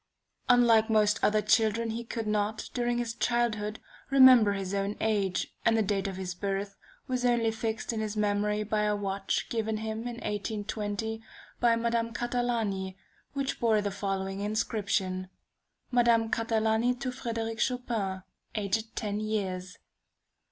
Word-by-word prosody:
Unlike 235 -2 +5
most 215 0 +3
other 215 0 +3
children, 225 +1 +2
he 230 +2 -4
could 230 -1 -4
not, 210 0 -1
during 240 -1 0
his 235 -1 -2
childhood, 220 -3 0 0.3
remember 255 -6 +7
his 195 -1 -4
own 200 +1 -1
age, 200 -4 0
and 225 -1 +4
the 220 - +3
date 200 -1 0
of 190 -1 -5
his 185 -1 -4
birth 195 +1 -3 0.3
was 255 -2 -1
only 235 -2 +3
fixed 225 +1 -3
in 225 - -2
his 215 -1 -3
memory 210 0 +1
by 210 0 0
a 210 0 +2
watch 195 -1 -2
given 220 -1 -1
him 220 0 -3
in 240 - -4
1820 210 0 -3 0.4
by 235 -1 +4
Madame 230 0 0
Catalani, 230 -6 -1 0.4
which 275 -1 -2
bore 225 -2 +3
the 205 -1 -1
following 195 -1 -3
inscription: 200 -3 -1 0.6
"Madame 235 -2 +3
Catalani 225 +1 +1
to 255 0 -3
Frederic 230 -3 -4
Chopin, 225 -7 -1 0.3
aged 215 +2 -1
ten 210 -1 -2
years." 195 -3 -3
220 Hz, 145 wpm, -29 LUFS, 205-230 Hz, 0.6 s, remember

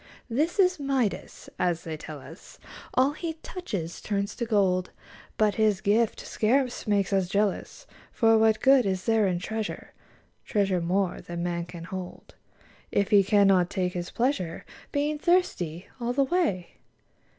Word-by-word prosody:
This 305 +9 0
is 370 -3 +3
Midas: 270 -6 -2
as 175 -2 0
they 160 -2 -5
tell 155 -1 -8
us, - - -13 0.4
All 260 +2 +4
he 325 +2 -4
touches 195 - -5
turns 200 -1 -2
to 235 - -2
gold, 190 -4 +2 0.5
But 215 -1 +3
his 210 -3 +3
gift 215 +3 +1
scarce 250 +2 0
makes 200 -2 +1
us 190 -2 +2
jealous; 205 - -1 0.3
For 225 -2 +4
what 220 -1 +3
good 265 -4 +5
is 190 -1 -2
there 220 -3 +3
in 180 -2 0
treasure. 220 +4 -5 0.5
Treasure 195 -4 0
more 180 +2 0
than 170 0 -5
man 170 -1 -2
can 170 -1 -9
hold. 185 +1 -8 0.6
If 200 - +1
he 200 -2 +7
cannot 195 -3 +4
take 180 -3 -1
his 175 -1 -4
pleasure, 235 - -1 0.3
Being 295 +1 -1
thirsty 195 - +1
all 240 0 -1
the 275 +2 +3
way 270 - -1
205 Hz, 150 wpm, -27 LUFS, 180-250 Hz, 0.6 s, he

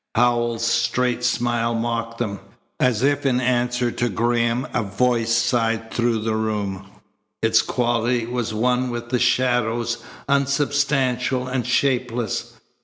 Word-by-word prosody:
Howells's 120 -1 +2
straight 120 +1 +1
smile 120 -1 0
mocked 115 0 -2
them. 100 -5 -3 0.4
As 125 -2 +2
if 145 0 +2
in 130 -3 +2
answer 125 -1 0
to 120 +1 -1
Graham 120 +4 0
a 120 - +1
voice 115 +3 0
sighed 115 -2 +1
through 120 -2 +1
the 110 0 -1
room. 100 -3 -2 0.6
Its 110 0 +4
quality 120 -1 0
was 120 -1 -3
one 125 +3 +1
with 120 0 -5
the 125 0 +1
shadows, 120 -1 +1 0.3
unsubstantial 140 -2 +1
and 130 -2 -2
shapeless. 125 -4 -1
120 Hz, 125 wpm, -22 LUFS, 115-125 Hz, 0.6 s, Its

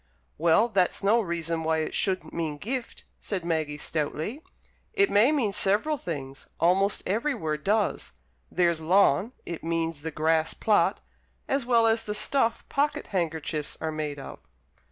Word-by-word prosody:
'" - - -41
"Well, 170 +8 +4
that's 195 -4 +1
no 220 +4 +4
reason 170 -3 -2
why 160 0 +1
it - - -5
shouldn't 190 -2 0
mean 160 -3 -3
'gift,'" 240 - -5 0.2
said 185 -5 -4
Maggie, 155 -3 -1
stoutly. 155 - -3 0.5
"It 400 -2 +3
may 220 +8 +5
mean 245 -10 +1
several 205 +10 +2
things 135 - -6
almost 190 +4 +2
every 235 +9 0
word 155 -7 -3
does. 200 - 0 0.4
There's 170 -2 +1
'lawn' 185 - +3
it 170 - -6
means 165 -2 -2
the 160 - -4
grass 160 +1 +1
plot, - - +2 0.5
as 275 -3 0
well 235 -2 +4
as 225 0 +2
the 210 - -3
stuff 230 +2 0
pocket 290 +1 -1
handkerchiefs 160 -4 -2
are 160 - -2
made 155 -2 -4
of." 135 - -9
175 Hz, 155 wpm, -27 LUFS, 160-220 Hz, 0.5 s, may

